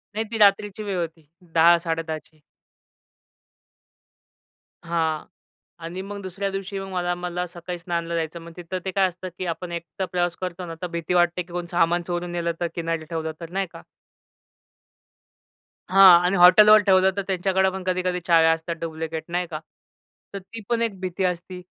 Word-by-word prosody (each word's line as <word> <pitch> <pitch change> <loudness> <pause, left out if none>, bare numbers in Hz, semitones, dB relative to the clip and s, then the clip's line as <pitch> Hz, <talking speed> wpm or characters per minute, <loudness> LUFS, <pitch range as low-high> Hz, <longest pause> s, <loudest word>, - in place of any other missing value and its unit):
नाही 220 +1 -1
ती 225 - -2
रात्रीची 205 0 +3
वेळ 200 -3 -3
होती. 165 -2 -6 0.3
10-10:30 165 -1 +3
ची. 155 -1 -25 2.4
हां, 160 -2 -1 0.6
आणि 175 +3 -5
मग 200 +1 -7
दुसऱ्या 195 +1 -3
दिवशी 195 0 -5
मग 195 - -6
मला 175 -1 -1
मला 180 0 -4
सकाळी 175 0 -7
स्नानाला 170 -1 -3
जायचं. 165 0 -3
मग 165 0 -11
तिथं 180 +1 -5
ते 190 - -2
काय 190 0 +3
असतं 185 +1 -8
की 185 - -3
आपण 175 +1 -8
एकटा 170 +3 -5
प्रवास 175 -1 -1
करतो 180 -1 -5
ना, 165 - -6
तर - - -1
भीती 170 0 -3
वाटते 175 0 +2
की 175 0 -6
सामान 175 0 +2
चोरून 175 0 -3
नेलं 170 -1 -1
तर, 175 - +1
किनारी 165 -1 -2
ठेवलं 160 0 -4
तर, 165 -1 -8
नाही 195 +1 -1
का? - - -11 2.1
हां, 185 -2 +9
आणि 185 +2 +2
हॉटेलवर 210 +4 +8
ठेवलं 190 -1 +5
तर - - +1
त्यांच्याकडे 190 0 +1
पण 190 0 -6
कधी-कधी 180 0 -1
चाव्या 165 -2 +5
असतात 165 +1 -4
डुप्लिकेट, 160 -1 -4
नाही 175 +1 -1
का? 155 -2 -5 0.7
तर 200 - -4
ती 225 +4 -10
पण 235 -1 +1
एक 215 -5 -1
भीती 185 0 -3
असती. 180 +1 -3
175 Hz, 170 wpm, -24 LUFS, 170-190 Hz, 2.4 s, हां